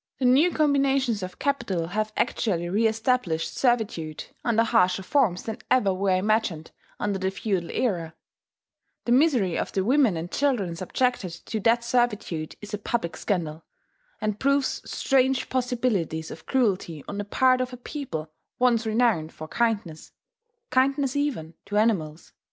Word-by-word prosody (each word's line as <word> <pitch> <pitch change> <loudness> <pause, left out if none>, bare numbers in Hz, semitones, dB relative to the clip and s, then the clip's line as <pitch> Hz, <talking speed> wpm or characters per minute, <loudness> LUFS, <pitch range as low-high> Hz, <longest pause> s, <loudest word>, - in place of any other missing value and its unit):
The 260 - -1
new 270 +8 +5
combinations 275 - +2
of 185 0 -6
capital 205 - -1
have 215 +3 -1
actually 185 -8 0
reestablished 220 -3 0
servitude, 215 - 0 0.2
under 230 -1 +3
harsher 190 -3 +2
forms 195 -5 +1
than 220 -1 -5
ever 205 -7 +3
were 190 0 +1
imagined 190 -5 0 0.3
under 200 -2 -1
the 190 0 0
feudal 190 -3 -2
era; 170 -9 -1 0.9
the 240 - 0
misery 250 - +3
of - - -3
the 190 - +1
women 250 - +3
and 165 +2 -5
children 240 -12 0
subjected 190 +2 -1
to 220 - -3
that 230 +3 +3
servitude 230 -10 -1
is 210 +1 -9
a 210 - -2
public 205 -5 -2
scandal, 165 -5 -2 0.6
and 210 -1 -2
proves 275 0 +1
strange 265 -1 +1
possibilities 235 - -1
of 160 - -11
cruelty 190 - 0
on 200 - -5
the - - -1
part 255 +5 +3
of 255 0 -2
a 250 - -8
people 240 - -6 0.3
once 240 -2 +2
renowned 220 -8 +2
for 155 - -9
kindness, 205 -7 -2 0.6
kindness 270 +1 +2
even 260 - -2
to 205 - -1
animals. 170 -8 0
215 Hz, 145 wpm, -25 LUFS, 180-255 Hz, 0.9 s, new